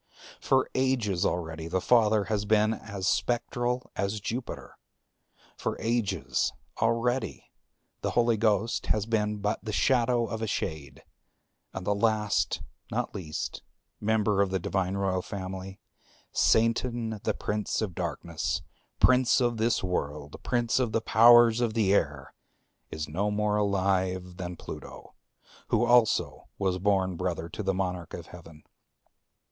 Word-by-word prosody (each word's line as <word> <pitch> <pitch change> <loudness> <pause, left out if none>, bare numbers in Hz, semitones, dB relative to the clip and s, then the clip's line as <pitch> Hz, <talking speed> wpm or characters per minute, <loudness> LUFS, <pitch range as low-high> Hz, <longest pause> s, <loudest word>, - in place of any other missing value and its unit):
For 130 -1 +2
ages 125 -9 +1
already 80 -2 -3
the 95 +3 0
Father 110 -1 +4
has 105 0 -1
been 110 +1 +3
as 100 -4 -5
spectral 120 +1 -1
as 100 +2 -1
Jupiter; 120 +4 -6 0.8
for - - -3
ages 115 -2 0 0.3
already 115 +3 0 0.5
the - - -1
Holy 120 -1 +4
Ghost 110 0 +1
has 105 -2 +1
been 105 -2 0
but 105 +1 -2
the 110 - -4
shadow 120 +1 +2
of 110 -1 -5
a 110 - -1
shade. 75 -9 -4 0.7
And 95 -1 -6
the 105 - +2
last, 105 -6 +1 0.3
not - - -2
least, 80 -5 -5 0.4
member 105 -2 +2
of 100 - +2
the 95 - 0
Divine 95 +1 -1
Royal 95 -2 0
Family, 95 0 -6 0.5
Satan 115 -1 +1
the - - 0
Prince 105 0 -2
of 105 -5 -2
Darkness, 85 -1 -3 0.4
Prince 130 0 +5
of 120 -2 +1
this 115 -1 +1
World, 75 -5 -3
and - - -11
Prince 120 0 +1
of 120 -4 0
the 115 - +1
Powers 120 +1 +6
of 115 -2 0
the 100 -4 +3
Air, 70 -7 0 0.6
is 80 -1 -4
no 95 +7 -1
more 105 0 0
alive 95 -3 0
than 90 -1 -5
Pluto, - - -10 0.5
who 120 - +2
also 120 -2 +3
was 95 -2 0
born 95 -2 +1
brother 85 -1 -2
to 85 - -5
the 95 -2 0
Monarch 90 -3 -3
of - - -8
Heaven. 80 -3 -13
105 Hz, 140 wpm, -28 LUFS, 95-115 Hz, 0.8 s, Powers